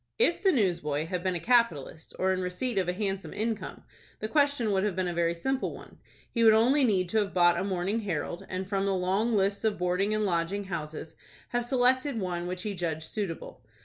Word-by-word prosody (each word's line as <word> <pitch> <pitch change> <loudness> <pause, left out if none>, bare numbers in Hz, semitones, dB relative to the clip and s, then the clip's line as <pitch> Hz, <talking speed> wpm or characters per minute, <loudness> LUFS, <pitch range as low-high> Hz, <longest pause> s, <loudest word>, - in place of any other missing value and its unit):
If 470 - +2
the 385 - +4
newsboy 170 - 0
had 180 +1 -3
been 185 -1 0
a - - -1
capitalist, 170 - +1
or 190 0 +2
in 185 - -2
receipt 195 +5 -2
of 185 - -1
a - - 0
handsome 195 0 -3
income, 220 0 -3 0.4
the 215 - -3
question 285 -4 +2
would 190 -1 +2
have 205 -4 0
been 185 -1 0
a 175 - -2
very 170 0 +1
simple 265 +10 -2
one. - - -14 0.3
He 230 - +1
would 220 -1 +7
only 260 +6 +4
need 190 -7 +2
to 220 - +2
have 200 -2 -2
bought 175 -1 +5
a - - -1
"Morning 195 +3 -1
Herald," 175 -2 -3
and, 185 0 -3
from 195 0 0
the 195 - +1
long 195 +5 +1
list 200 +1 +1
of 220 -2 +1
boarding 180 +4 +1
and 215 0 0
lodging 180 +2 0
houses, 160 -4 -6 0.3
have 240 0 -1
selected 255 +1 +2
one 175 -2 -3
which 180 0 -4
he 210 - -2
judged 165 -4 -3
suitable. 195 -6 -5
195 Hz, 215 wpm, -28 LUFS, 175-220 Hz, 0.4 s, would